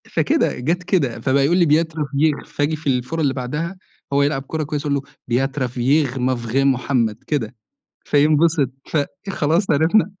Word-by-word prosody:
فكده - - +1
جَت 170 +8 -1
كده 145 - 0
فبقى 135 +2 +2
يقول 170 +5 +2
لي: 175 - +4
"Beau 160 +3 +4
travail" 150 -1 -1
فآجي 145 +2 +1
في 155 -1 -9
الفورة 130 +5 0
اللي 140 -3 +1
بَعدها 150 +8 -4 0.4
هو 140 0 +4
يلعب 140 -1 0
كُرة 160 -1 -2
كويسة 150 0 -3
أقول - - +1
له: 140 - 0 0.3
"Beau 135 +3 +1
travail 130 +1 0
mon 125 -2 -1
frère 125 - -1
محمد." 125 -4 0
كده 130 -6 -2 0.5
فينبسط، 150 0 +3 0.2
فخلاص 170 +2 -1
عرِفنا. 160 +8 +3
145 Hz, 165 wpm, -20 LUFS, 130-160 Hz, 0.5 s, لي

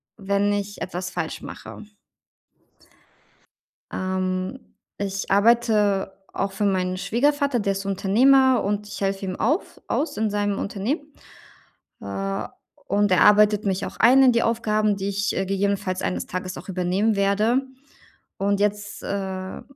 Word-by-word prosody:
wenn 200 0 0
ich 205 0 -4
etwas 185 0 -4
falsch - - -4
mache. 215 - -10 2.0
Ähm, 185 +4 -2 0.4
ich 195 0 -3
arbeite 210 -2 +3 0.2
auch 195 0 -2
für 205 +2 -2
meinen 185 -2 0
Schwiegervater, 280 +5 +1
der 200 -2 0
ist 195 0 -5
Unternehmer 250 +7 +4
und 205 +1 -2
ich 200 - -7
helfe 195 0 -1
ihm 185 -1 -3
auf 300 - -1
aus 300 -7 -1
in 220 0 +1
seinem 205 -1 -1
Unternehmen. 275 - -3 0.9
Äh, 100 0 -3 0.4
und 205 +1 +2
er 185 - +4
arbeitet 210 0 +5
mich 195 -1 -1
auch - - -8
ein 255 +4 +6
in 255 -2 +6
die 235 - +2
Aufgaben, 215 -2 +1
die 195 0 -3
ich, 200 0 -1
äh, 190 - -1
gegebenenfalls 195 -1 -1
eines 90 -1 -2
Tages 185 0 -5
auch - - -12
übernehmen 190 +4 0
werde. 210 +6 +2 0.8
Und 200 0 0
jetzt, 205 0 -2
äh, 190 -1 -4
200 Hz, 140 wpm, -23 LUFS, 190-215 Hz, 2.0 s, ein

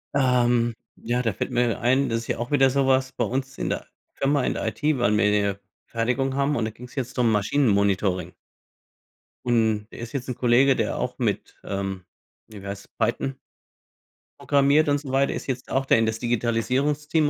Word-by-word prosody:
Ähm, 120 -3 +3 0.2
ja, 120 +2 -1
da 115 -3 0
fällt - - -4
mir 120 -2 +1
ein, 130 +3 +2
das 115 0 0
ist 115 - -9
ja - - -1
auch 120 +3 -5
wieder 135 -2 +5
sowas, 130 -1 +2
bei 120 - -1
uns 130 +4 -3
in - - -2
der - - -3 0.3
Firma, 140 -1 +1
in - - 0
der - - -3
IT, - - -5
weil 105 -3 +2
wir 110 - +3
hier 100 -1 +1 0.3
Fertigung 125 +3 -1
haben 140 +1 +1
und, 115 - 0
da 110 - -3
ging's 125 +4 -13
jetzt 130 -1 -4
drum 120 -2 +3
Maschinen-Monitoring. 100 - +1 1.1
Und 110 -3 +1
der - - -11
ist 115 -1 -7
jetzt 135 -2 -4
'n 125 - -2
Kollege, 130 +2 +4
der - - -1
auch - - -3
mit, - - -2
ähm, 95 -2 -4 0.4
hier 105 -3 -11
wie 100 - -9
heißt 100 0 -8
Python 135 -1 -1 1.0
programmiert 145 +2 +3
und 145 - +3
so 140 -2 -8
weiter 135 +1 +2
ist - - -6
jetzt 130 -1 -4
auch 135 0 0
da - - +4
in 115 0 +3
das 110 0 -2
Digitalisierungsteam 130 +6 0
120 Hz, 195 wpm, -24 LUFS, 110-135 Hz, 1.1 s, wieder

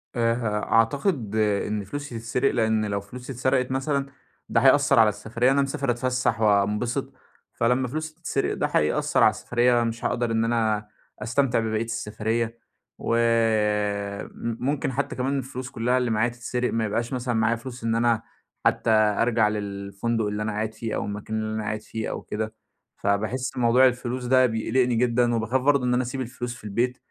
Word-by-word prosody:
آآ، 115 -1 +2
ه 105 -3 -2
أعتقد 115 - +1
إن 105 -1 0
فلوسي 125 +2 -6
تتسرق 125 +4 0
لإن 110 -2 +1
لو 100 -1 -2
فلوسي 125 +6 -9
اتسرقت 130 +1 +1
مثلًا 140 +1 0 0.4
ده - - +3
هيأثّر - - +5
على - - +7
السفرية، 120 +4 0
أنا 140 0 +3
مسافر 140 -2 -1
أتفسّح 125 -2 0
وانبسط 105 +3 +1 0.4
فلمّا 125 +2 +1
فلوسي 155 +4 -5
تتسرق 160 -5 -1
ده - - 0
هيأثّر 75 - +2
على - - +8
السفرية، 120 0 +1
مش 115 0 -3
هاقدر 120 -1 0
إن 115 0 +1
أنا 110 -3 0 0.3
أستمتع 120 +2 +1
ببقية 110 0 -1
السفرية، 115 +1 -2 0.4
وم 105 -3 +1 0.3
ممكن 135 0 -1
حتّى 140 +3 -2
كمان 135 +2 -1
الفلوس 130 -1 -5
كلّها 125 +1 0
اللي 125 -2 0
معايا 110 +2 +2
تتسرق، 120 +1 -3
ما 115 -1 +1
يبقاش 115 +4 -2
مثلًا 125 -1 -1
معايا 110 +1 +2
فلوس 120 0 -9
إن 115 0 +1
أنا 115 -1 +2 0.4
حتّى - - +2
أرجع 110 +1 +3
للفندق 100 +2 -2
اللي 105 +1 -2
أنا 105 - -2
قاعد 110 +1 -2
فيه 115 -2 -4
أو - - -2
المكان 105 +2 -4
اللي 110 0 -3
أنا 110 - -2
قاعد 110 +1 -3
فيه 110 -1 -5
أو - - -4
كده، 110 +1 -4 0.4
فباحس 110 +7 -1
موضوع 125 +2 +5
الفلوس 125 0 -2
ده 130 +1 +5
بيقلقني 120 +2 +1
جدًا 120 0 +2
وباخاف 115 +4 0
برضه 140 -2 +3
إن 125 - +2
أنا 125 - +2
أسيب 130 +2 -4
الفلوس 120 -1 -5
في - - -15
البيت، 120 +4 -1
115 Hz, 175 wpm, -25 LUFS, 110-125 Hz, 0.4 s, على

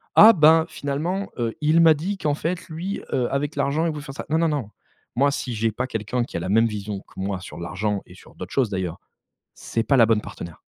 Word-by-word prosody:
«Ah 220 - +10
ben 160 -3 +5
finalement, 165 +8 -3
heu, 115 -2 -2
il 155 +2 +4
m'a 165 -1 +7
dit 180 +7 -3
qu'en 150 -6 0
fait 170 +4 -4
lui, 175 +5 -4
heu, 125 -2 +1
avec 145 +2 -1
l'argent 150 +4 +1
il 165 - 0
veut 150 - -6
faire 135 -2 -9
ça». - - -6
Non, 160 - +2
non, 165 - +2
non, 145 -9 -2 0.5
moi 140 +3 +4
si 130 -3 -3
j'ai 115 0 0
pas 130 - -2
quelqu'un 115 +1 -2
qui 120 - -6
a - - -2
la 85 - -4
même 115 +3 +4
vision 105 -2 -5
que - - -15
moi 95 -1 -3
sur - - -9
l'argent 100 +4 -2
et - - -15
sur - - -17
d'autres 90 - -8
choses 130 -5 +2
d'ailleurs, 95 -4 -3 0.6
c'est 115 - -2
pas 135 +4 +2
la 115 -3 +6
bonne 110 -1 +3
partenaire. 85 -5 -9
135 Hz, 245 wpm, -23 LUFS, 105-155 Hz, 0.6 s, Ah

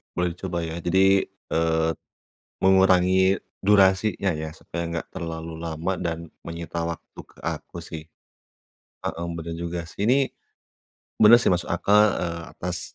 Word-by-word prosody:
Boleh 90 -1 0
dicoba 90 0 -5
ya 80 0 -4
jadi, 95 +3 +3 0.3
eee, 80 0 +2 0.7
mengurangi 95 0 +5 0.2
durasinya 100 0 +3
ya, 80 0 -4
supaya 85 - -5
nggak 85 -1 -4
terlalu 80 -2 -5
lama 85 +3 -2
dan 85 -1 -1 0.2
menyita 85 0 -5
waktu 85 - -9
ke - - -24
aku - - -5
sih. 80 -2 -6 1.0
Heeh, 85 +1 -3
benar 85 0 -5
juga 85 0 -3
sih. 100 +5 -3
Ini, 125 - +5 1.0
bener 110 +2 +9
sih - - +3
masuk 90 -2 +1
akal, 100 +4 +4 0.2
eee, 85 -1 -3
atas 90 0 -5
85 Hz, 135 wpm, -24 LUFS, 85-95 Hz, 1.0 s, bener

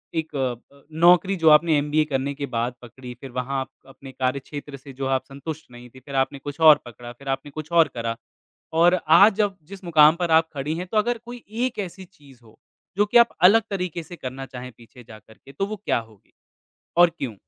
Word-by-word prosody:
एक 160 -2 -3
अ, 130 +1 -5 0.2
नौकरी 180 +2 +5
जो 165 -3 +4
आपने 155 +1 +5
एमबीए 150 +2 +1
करने 135 +1 -1
के 145 - -4
बाद 120 +2 -1
पकड़ी, 125 +1 -11
फिर 135 - -9
वहाँ 130 +2 -3
आप - - -7 0.2
अपने 135 0 -12
कार्यक्षेत्र 140 +2 -4
से 135 +1 -13
जो 135 - -2
आप 130 - -2
संतुष्ट 145 +1 -9
नहीं 120 0 -13
थीं, 130 +2 -16
फिर 140 - -8
आपने 135 +1 0
कुछ 145 +3 -8
और 155 -2 +7
पकड़ा, 120 0 -10
फिर 140 +3 -16
आपने 135 +2 -3
कुछ 155 +3 -8
और 165 -2 +5
करा 115 0 -2 0.6
और 175 +1 +5 0.2
आज 200 +4 +7
जब 205 -2 0
जिस 195 +1 -11
मुकाम 155 -2 +5
पर 170 -1 -2
आप 160 0 +4
खड़ी 145 +2 -3
हैं 180 +1 -5
तो 215 - -2
अगर 240 +3 +1
कोई 240 0 -10 0.2
एक 245 - -9
ऐसी 190 -1 -6
चीज़ 145 -8 -20
हो, 110 -1 -20 0.4
जो 205 - +4
कि 210 - +3
आप 235 0 +6 0.2
अलग 225 +3 +5
तरीके 180 -4 -4
से 175 - -11
करना 135 -3 -7
चाहें 125 -1 -9
पीछे 120 +1 -16
जा 110 -2 -13
करके 110 +5 -18
तो 140 +8 -2
वो 215 +2 -5
क्या 200 - -1
होगी? 110 -3 -16 0.7
और 175 0 +6
क्यों? 120 -6 -4
145 Hz, 220 wpm, -23 LUFS, 130-175 Hz, 0.7 s, और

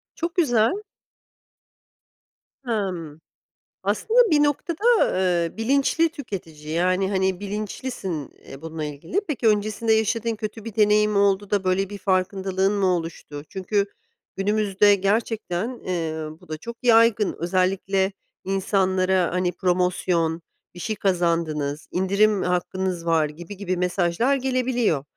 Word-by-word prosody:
Çok 335 +1 -3
güzel. 290 - +2 1.8
Hımm. 180 -9 -3 0.6
Aslında 225 - +1
bir 295 -1 +5
noktada, 340 - +2
eee, 175 -1 0
bilinçli 275 +7 +2
tüketici, 165 - -8
yani, 185 +3 +1
hani, 190 -2 0
bilinçlisin, 205 - -4 0.2
eee, 135 - -11
bununla 160 -1 -5
ilgili. 150 - -3
Peki, 260 -6 0
öncesinde 215 +1 +2
yaşadığın 225 +1 0
kötü 215 0 -6
bir 225 - -7
deneyim 210 -1 +3
oldu 200 0 +2
da 200 -2 +1
böyle 185 +1 +1
bir 205 - -6
farkındalığın 190 0 0
mı 200 -2 +1
oluştu? 165 -4 -3
Çünkü 200 +1 0 0.5
günümüzde 205 0 +3
gerçekten 205 0 -1
ııı 160 -8 -4
bu 180 - -19
da 155 0 -5
çok 235 +7 -8
yaygın 225 -3 +4
özellikle 190 +2 +1 0.3
insanlara 190 -1 +1
hani 180 0 0
promosyon, 180 -2 0 0.3
bir 175 - -9
şey 215 +3 -2
kazandınız, 165 -6 0
indirim 200 +2 +2
hakkınız 180 -1 -2
var 160 -2 +2
gibi 175 +6 -10
gibi 185 -3 -2
mesajlar 180 +8 +1
gelebiliyor. 255 - 0
195 Hz, 120 wpm, -23 LUFS, 175-220 Hz, 1.8 s, bir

